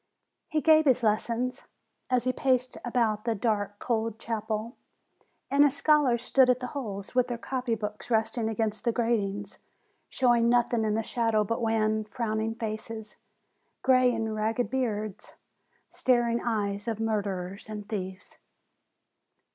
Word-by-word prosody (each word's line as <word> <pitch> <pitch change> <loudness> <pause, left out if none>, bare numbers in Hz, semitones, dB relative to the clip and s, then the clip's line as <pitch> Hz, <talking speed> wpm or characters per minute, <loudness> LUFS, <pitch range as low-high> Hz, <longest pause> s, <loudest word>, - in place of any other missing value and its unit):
He 310 0 0
gave 315 0 +5
his 255 -3 +3
lessons 230 +3 0 0.4
as 250 -1 +2
he 255 0 0
paced 255 -1 +1
about 230 -4 0
the 230 -1 0
dark, 205 -1 -1
cold 225 -2 -1
chapel, 220 +1 -3 0.8
and 280 +1 +6
his 290 -1 +3
scholars 280 -7 +3
stood 260 0 +4
at 250 0 +3
the 250 - -4
holes, 205 -8 -5
with 250 0 +3
their 240 -1 -3
copy 250 -1 -2
books 210 +2 -6
resting 225 0 +1
against 220 -1 -2
the 235 - +2
gratings, 205 -4 -1 0.5
showing 240 -2 +3
noth 240 0 +3
ing 225 -2 +1
in 210 -1 +1
the 225 - 0
shadow 225 -2 +1
but 230 +3 -2
wan, 220 -1 +1
frowning 220 0 -2
faces, 220 -1 -5 0.7
gray 255 -1 +5
and 225 -2 -2
ragged 220 +3 -1
beards, 215 -6 -3 0.5
staring 240 -2 +1
eyes 205 -2 -1
of 225 -2 -2
murderers 200 -3 -2
and 210 -1 -6
thieves. 190 -3 -6
225 Hz, 145 wpm, -28 LUFS, 215-245 Hz, 0.8 s, and